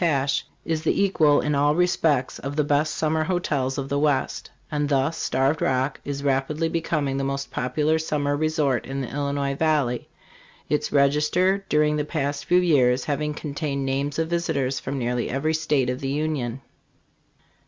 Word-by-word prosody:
Tatsch, 140 -5 +2 0.2
is 160 -1 -1
the 160 - +1
equal 160 -7 +4
in 150 - 0
all 145 +1 +3
respects 160 -6 +1
of 140 +2 -5
the 150 - +2
best 145 +2 +1
summer 155 0 0
hotels 145 -7 -1
of 135 -1 -3
the 140 +1 0
West; 145 -2 0 0.2
and 145 -1 -1
thus 140 +3 +1
Starved 135 +4 0
Rock 130 +1 0
is 140 0 -4
rapidly 145 +4 0
becoming 155 -5 -1
the 135 - -1
most 140 0 -3
popular 150 +5 0
summer 145 -2 -1
resort 150 -4 0
in 135 +1 -3
the 125 - -5
Illinois 140 -1 -1
valley, 140 -5 0 0.6
its 150 0 -1
register 150 +8 +2
during 150 0 +2
the 150 - 0
past 145 -1 -3
few 180 - +3
years 135 -8 +3
having 150 +1 -2
contained 140 -2 -3
names 140 +2 -1
of 160 0 0
visitors 160 -6 -1
from 140 - -4
nearly 125 -1 -1
every 145 +5 0
state 150 -4 +1
of 125 - -4
the 135 - -3
Union. 140 -4 -2
145 Hz, 170 wpm, -24 LUFS, 135-155 Hz, 0.6 s, equal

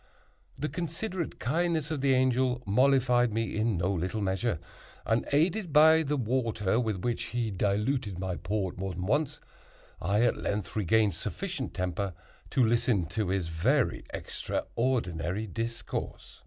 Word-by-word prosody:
The 150 - -2
considerate 175 +2 -4
kindness 160 +2 0
of 150 -4 -2
the 135 -1 +4
Angel 130 -1 +2
mollified 125 +2 +3
me 115 +1 -1
in 110 -2 +1
no 90 +3 +1
little 95 +4 -2
measure; 100 +1 0 0.5
and, 115 +1 +1
aided 170 +5 +2
by 160 +2 +7
the 150 -1 -1
water 115 -4 0
with 110 -6 -1
which 120 -1 -1
he 115 -2 -2
diluted 105 +2 0
my 90 -1 -3
Port 95 -1 -2
more 95 -1 -3
than 90 +1 -4
once, 145 +6 0 0.6
I 100 +6 +2
at 120 - +2
length 100 -4 -3
regained 105 0 +3
sufficient 135 - -4
temper 90 0 -2 0.3
to 130 - +3
listen 115 -4 +2
to 105 -5 -1
his 95 -3 -1
very 115 - +1
extraordinary 105 -6 -2
discourse. 115 +3 -5
115 Hz, 140 wpm, -29 LUFS, 100-135 Hz, 0.6 s, by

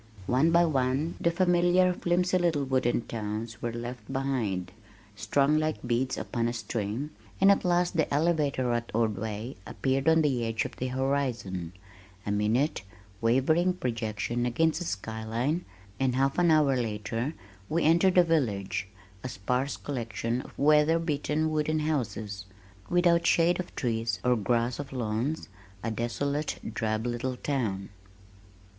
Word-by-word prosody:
One 130 - +3
by 170 +1 +5
one 140 +1 0
the 170 - +3
familiar 175 +1 +3
flimsy 180 +1 +1
little 165 -5 +1
wooden 130 -3 +1
towns 110 0 -5
were 120 - -2
left 120 0 -7
behind 120 -10 -1 0.4
(strung 145 +7 +2
like 155 -4 -2
beads 125 +2 0
upon 115 -1 -1
a 120 - -1
string), 115 +4 -3 0.3
and 195 +1 +7
at 200 - +2
last 175 0 +2
the 160 - +1
elevator 145 -5 +1
at 120 0 -2
Ordway 110 +1 -2
appeared 135 +2 0
on 160 0 +5
the 130 -5 +1
edge 115 -1 -1
of - - -6
the 130 - -2
horizon, 125 -10 -2 0.5
a 100 - -1
minute, 110 +8 +1 0.4
wavering 145 +10 +3
projection 120 - -2
against 160 +6 +1
the 175 - -4
sky 110 -2 -4
line, 125 +10 -1 0.3
and 130 -2 +1
half 135 +4 +1
an 175 -1 +4
hour 150 -4 +4
later 115 +4 -2 0.3
we 165 +1 +1
entered 170 +4 +4
the 180 - +7
village, 110 - 0 0.4
a 130 - -3
sparse 125 +7 -1
collection 120 -2 -3
of - - -14
weather 150 +2 +4
beaten 155 -1 -1
wooden 155 0 0
houses, 110 -10 -2 0.4
without 170 -1 +3
shade 170 +2 +3
of 180 - -6
trees 115 -5 -1
or 125 0 +3
grass 120 +3 0
of 140 -1 -6
lawns, 125 +4 -2 0.4
a 115 - -1
desolate, 140 +6 -2 0.2
drab 110 0 -1
little 120 +1 -2
town. 110 -10 -2
130 Hz, 145 wpm, -28 LUFS, 115-155 Hz, 0.5 s, and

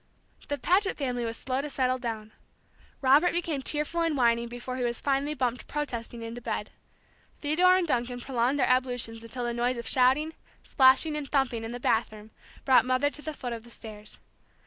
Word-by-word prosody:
The 285 - -2
Paget 380 +6 +1
family 250 -4 -2
was 225 0 -4
slow 260 0 -2
to 295 - -5
settle 255 -2 0
down. 220 -3 -5 0.7
Robert 285 +6 +5
became 330 -5 -1
tearful 300 +4 -2
and 325 -3 +1
whining 235 -1 +3
before 245 +2 -6
he 250 - -2
was 240 -1 -1
finally 285 +2 0
bumped 250 -2 -2
protesting 240 -5 -4
into 230 +1 -6
bed. - - -4 0.7
Theodore 360 +5 +4
and 370 - +1
Duncan 245 -2 -1
prolonged 250 +1 0
their 265 - +3
ablutions 245 -3 0
until 245 +2 -5
the 240 - -1
noise 240 +1 0
of 235 - -6
shouting, 270 +5 +3 0.3
splashing, 265 +3 +4
and 295 -2 -4
thumping 255 -5 +1
in 225 - -5
the 245 - -5
bathroom 220 -2 -1 0.3
brought 260 -4 +6
Mother 255 +3 +1
to 295 - -10
the 310 - -4
foot 245 -3 -4
of 230 -1 -7
the 240 - -15
stairs. 215 -2 -10
255 Hz, 190 wpm, -28 LUFS, 235-290 Hz, 0.7 s, brought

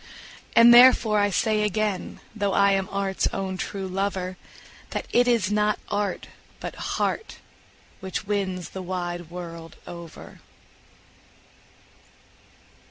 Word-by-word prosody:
And 235 +1 +8
therefore 240 -3 +7
I 205 0 +3
say 215 +2 +1
again, 210 -2 -2
though 200 -2 0
I 200 0 +4
am 195 -1 0
art's 195 -1 -1
own 190 -1 -3
true 190 +1 -4
lover, 185 -1 -2 0.5
That - - -4
it 245 +1 +4
is 225 -5 +2
not 210 0 +2
art, 205 -2 -2 0.3
but - - -6
heart, 445 - -3 0.6
which 190 0 -5
wins 190 -4 -2
the 190 - -6
wide 175 -2 -4
world 170 -2 -8
over. 170 -2 -11
195 Hz, 115 wpm, -25 LUFS, 185-210 Hz, 0.6 s, And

